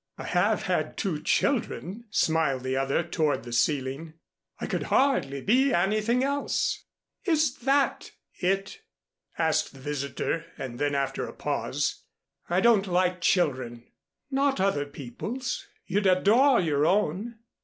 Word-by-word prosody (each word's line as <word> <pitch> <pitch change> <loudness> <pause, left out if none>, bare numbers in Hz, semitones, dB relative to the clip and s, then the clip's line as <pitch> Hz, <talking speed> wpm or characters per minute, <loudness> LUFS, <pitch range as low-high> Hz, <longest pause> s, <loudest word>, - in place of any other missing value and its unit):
"I - - -7
have - - +1
had - - -1
two 175 -8 -2
children," 230 - -1
smiled 160 -9 +1
the 130 0 -1
other 135 +5 +1
toward 155 -7 0
the 120 0 -7
ceiling. 140 +5 -1 0.4
"I - - -3
could - - -2
hardly 145 - +2
be 260 - +3
anything 215 +7 +2
else." 280 +1 -1 0.4
"Is 310 -7 +2
that 275 +2 +1 0.3
it?" 195 - -1 0.6
asked 160 -2 +1
the 135 - -13
visitor; 145 +3 -3
and 125 -2 -6
then 145 -1 0
after 140 -1 -1
a - - -9
pause, - - -2 0.5
"I 175 +2 +2
don't 220 -4 +4
like 180 0 +1
children." 130 -10 0 0.4
"Not 275 -2 +1
other 165 -7 +1
people's. 150 - -5 0.2
You'd 200 +2 +1
adore 225 +9 +5
your 150 -3 +2
own." 205 +4 0
180 Hz, 135 wpm, -27 LUFS, 145-235 Hz, 0.6 s, adore